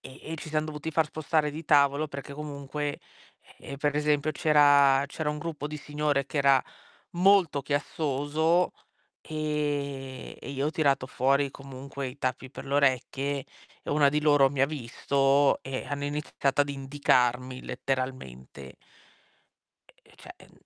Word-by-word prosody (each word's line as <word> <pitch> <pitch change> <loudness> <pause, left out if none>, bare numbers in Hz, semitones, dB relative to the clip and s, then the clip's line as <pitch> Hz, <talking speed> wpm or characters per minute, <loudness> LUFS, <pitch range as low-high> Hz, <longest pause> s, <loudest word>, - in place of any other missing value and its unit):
e 130 - -12
e - - -3
ci 155 - -8
siam 155 0 0
dovuti 155 +1 -5
far 160 0 +2
spostare 155 0 0
di 155 +2 -8
tavolo 145 +1 +3
perché 140 0 -7
comunque, 145 0 -5 0.6
ehm, 140 - -8
per 145 0 0
esempio, 150 0 +1
c'era 145 -3 +5
c'era 150 +2 -3
un 150 - -4
gruppo 150 -2 -5
di 150 0 -6
signore 145 -1 -1
che 145 - -3
era 140 -2 +5 0.5
molto 180 -5 +3
chiassoso, 145 +4 0 0.5
ehm, 145 -4 -3
e - - -9
io 140 +1 -2
ho - - -1
tirato 140 -5 +1
fuori 135 +2 +1
comunque 135 0 -7
i 125 +3 -9
tappi 130 0 -3
per - - -9
le 140 - -4
orecchie 140 0 0 0.4
e - - -7
una 145 -1 +4
di 150 +1 0
loro 145 -3 +5
mi 135 -1 -1
ha 135 - +6
visto 140 0 +1
e 135 -1 -5
hanno 145 0 -3
iniziato 145 -1 0
ad 145 - -2
indicarmi 130 -2 0
letteralmente. 125 - -5 1.4
E - - -21
cioè - - -11
en - - -22
140 Hz, 150 wpm, -28 LUFS, 135-150 Hz, 1.4 s, ha